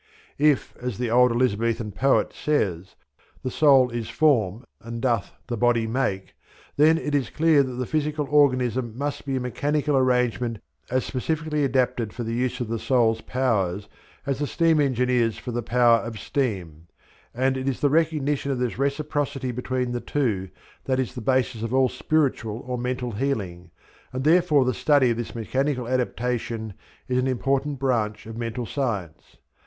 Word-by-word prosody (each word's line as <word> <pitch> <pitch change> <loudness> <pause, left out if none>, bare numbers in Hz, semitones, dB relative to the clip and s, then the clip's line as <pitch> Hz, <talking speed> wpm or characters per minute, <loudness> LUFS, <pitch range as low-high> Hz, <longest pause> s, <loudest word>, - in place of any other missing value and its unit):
If, 150 -2 +2
as 125 -4 -4
the 120 -1 -2
old 125 +1 +5
Elizabethan 115 -2 0
poet 135 +7 +2
says, 95 - -1 0.5
"the 130 - -2
soul 135 -4 +5
is 120 -2 -4
form, 120 -7 +2 0.2
and 115 +1 -6
doth 120 -4 0
the 120 - -3
body 120 0 +2
make," 110 -5 -2 0.4
then 155 +3 +5
it 150 -2 -3
is 140 -3 +1
clear 160 -2 +4
that 130 -2 -2
the 125 +1 -3
physical 150 +1 -1
organism 130 -5 +2
must 145 +1 -4
be 135 - -1
a - - 0
mechanical 145 +4 -1
arrangement 125 -2 +1 0.3
as 130 +1 0
specially 150 +3 -2
adapted 125 -5 0
for 120 - -5
the 115 0 -3
use 125 +1 -1
of 120 - -2
the 115 0 -3
soul's 115 -4 +2
powers 105 -7 -1 0.4
as 140 0 -2
a 145 - 0
steam 165 0 +2
engine 125 -3 +1
is 115 -3 +1
for 125 - -6
the 120 +1 -2
power 120 0 +4
of 115 -1 -6
steam; 90 - -3 0.4
and 130 +2 0
it 130 +1 -1
is 130 - -3
the 145 - +3
recognition 150 -3 +1
of 135 - -1
this 125 0 -2
reciprocity 140 -2 -1
between 125 0 -2
the 120 0 -3
two 105 -10 -1 0.4
that 130 -1 0
is 130 - -2
the 125 - -6
basis 125 -2 0
of 115 +3 -2
all 130 -1 +4
spiritual 130 -5 -1
or 125 0 -3
mental 125 0 -3
healing, 100 -8 -3 0.4
and 130 +1 -3
therefore 155 -3 +4
the 125 - +1
study 140 -1 +3
of 115 - -1
this 120 0 -5
mechanical 130 +2 -1
adaptation 120 -3 -2 0.3
is 125 0 +1
an 130 - 0
important 135 +3 0
branch 115 -5 -1
of 115 0 -8
Mental 115 +1 -4
Science. 105 - -4
125 Hz, 170 wpm, -24 LUFS, 115-140 Hz, 0.5 s, old